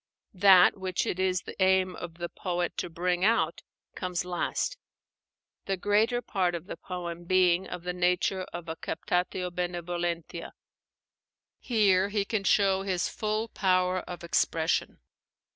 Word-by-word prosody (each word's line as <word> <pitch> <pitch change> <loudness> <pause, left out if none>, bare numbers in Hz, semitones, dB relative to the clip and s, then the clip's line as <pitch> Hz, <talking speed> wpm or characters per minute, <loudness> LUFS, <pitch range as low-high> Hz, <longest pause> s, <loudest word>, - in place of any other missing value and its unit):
That 190 -1 +7
which 190 -2 -2
it 180 - -2
is 185 -1 +1
the - - -9
aim 185 -1 +3
of 170 -2 -7
the 175 0 -4
poet 175 -1 -3
to 180 - -3
bring 175 +2 -1
out 200 -7 +2 0.3
comes 180 -1 -3
last; 180 - -1 0.9
the 195 -1 -1
greater 220 +6 +2
part 180 -3 0
of 170 0 -6
the - - -6
poem 175 -2 -6
being 185 0 +3
of 180 -1 -7
the 180 0 -3
nature 180 +1 +1
of 175 0 -7
a 160 - -4
captatio 180 +2 -2
benevolentia. 175 -1 -3 1.1
Here 200 -5 +3
he 205 -1 0
can 200 -2 -2
show 195 -2 +3
his 185 -2 -1
full 215 +1 -2
power 185 -2 +1
of 175 -1 -8
expression. 165 -1 0
180 Hz, 145 wpm, -28 LUFS, 175-190 Hz, 1.1 s, That